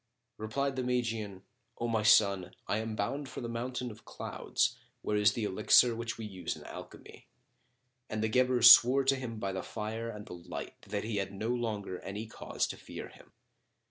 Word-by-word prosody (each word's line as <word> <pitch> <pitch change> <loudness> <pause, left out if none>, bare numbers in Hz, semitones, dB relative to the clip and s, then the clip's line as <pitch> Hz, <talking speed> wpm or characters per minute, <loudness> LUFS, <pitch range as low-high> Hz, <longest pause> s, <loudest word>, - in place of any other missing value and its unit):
Replied 135 +5 -2
the 130 - 0
Magian, 115 -6 -2 0.3
"O 120 - -2
my 115 -2 +1
son, 100 -4 +4
I 100 - 0
am 110 0 -4
bound 135 +7 -2
for - - -7
the 120 - -4
Mountain 125 +1 -3
of 110 +1 -14
Clouds, - - -2 0.3
where 105 - 0
is 105 +2 +4
the 115 - -3
Elixir 105 +4 +4
which 115 0 -4
we 110 - -6
use 95 -4 -4
in - - -12
alchemy." - - -11 0.8
And 110 0 -2
the - - +2
Guebre 125 +2 +2
swore 125 +3 +9
to 135 +1 +3
him 125 -4 -5
by 100 -2 -2
the 95 -1 -3
Fire 110 +3 -5
and 105 -2 -8
the - - -9
Light 85 -1 -7
that 100 0 -3
he 110 -1 -3
had 95 -1 -2
no 105 +3 -4
longer 110 -6 -2
any 100 +3 -6
cause 115 - -3
to - - -6
fear - - -8
him. - - -18
110 Hz, 195 wpm, -31 LUFS, 105-120 Hz, 0.8 s, swore